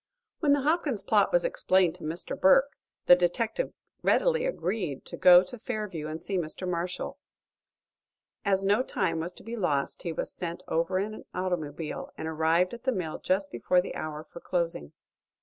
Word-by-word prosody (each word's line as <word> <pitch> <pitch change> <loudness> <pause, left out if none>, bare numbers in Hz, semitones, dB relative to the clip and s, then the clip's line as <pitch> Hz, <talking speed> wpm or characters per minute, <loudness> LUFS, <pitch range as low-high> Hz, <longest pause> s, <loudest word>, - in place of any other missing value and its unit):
When 295 -4 +4
the 285 - +2
Hopkins 290 - 0
plot - - +3
was - - +3
explained 190 - +2
to - - -13
Mr. 160 +9 0
Burke, 280 0 +5 0.3
the 180 - +9
detective 215 - -1 0.3
readily - - +2
agreed 185 - -3
to - - -6
go 180 0 +8
to 220 +6 -9
Fairview 210 -10 -4
and 155 +1 -5
see 195 -2 -1
Mr. 175 +3 -4
Marshall. 180 +1 -3 1.2
As 195 -1 +2
no 205 +4 +3
time 185 -9 -1
was 170 +2 -3
to - - -13
be 230 +2 -5
lost 150 -10 -1
he 170 - -3
was 160 - -3
sent 175 +1 -5
over 170 +3 0
in 205 +3 -2
an - - -10
automobile, 165 -4 -3
and 160 - -4
arrived 160 +4 +2
at 235 +1 -8
the 260 - +2
mill 180 -8 -3
just 190 +1 0
before 150 +9 +2
the 180 - -3
hour 155 0 -5
for 170 - -12
closing. 170 - -2
185 Hz, 180 wpm, -28 LUFS, 165-225 Hz, 1.2 s, the